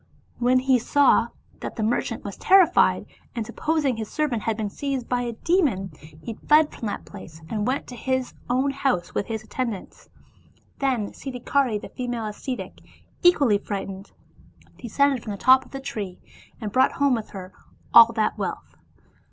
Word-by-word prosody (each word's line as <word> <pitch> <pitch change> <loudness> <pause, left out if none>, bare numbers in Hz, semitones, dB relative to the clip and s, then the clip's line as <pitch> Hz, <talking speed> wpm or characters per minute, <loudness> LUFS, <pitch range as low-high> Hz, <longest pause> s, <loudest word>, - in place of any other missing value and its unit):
When 250 +1 +3
he 260 -1 +3
saw 255 -1 +4 0.3
that, - - -6
the 220 - -2
merchant 225 +3 -1
was - - -6
terrified, 370 -2 +4 0.3
and 230 -2 -2
supposing 305 +1 0
that 225 - -7
his 220 - -4
servant 285 -8 -1
had 220 0 -1
been 210 -2 -3
seized 270 -2 -3
by 245 -1 0
a 240 -1 -3
demon, 235 - +1 0.3
he 230 - -5
fled 300 +6 +3
from 225 - -5
that 205 - -5
place, 175 -5 -11
and 210 0 -1
went 265 +3 -1
to 250 - -9
his 260 +1 -2 0.2
own 260 +3 +2
house 270 -10 -1
with - - -2
his 220 -1 -4
attendants. 230 -3 -5 0.7
Then 255 -7 0
Sid 270 -2 -7
dhikari 250 -3 +1
the - - -10
female 245 -3 -4
ascetic, 245 +5 -6 0.4
equally 280 - +4
frightened, 195 -1 -6 0.7
descended 270 +2 +1
from 215 - -5
the - - -6
top 260 +4 +5
of - - -19
the 270 - -5
tree, 205 -8 -5 0.4
and 215 -3 -4
brought 260 +5 +3
home 280 -1 +2
with 225 -3 -3
her 185 -1 -9 0.4
all 230 0 +9
that 220 -2 0
wealth. - - -4
245 Hz, 175 wpm, -24 LUFS, 215-270 Hz, 0.7 s, all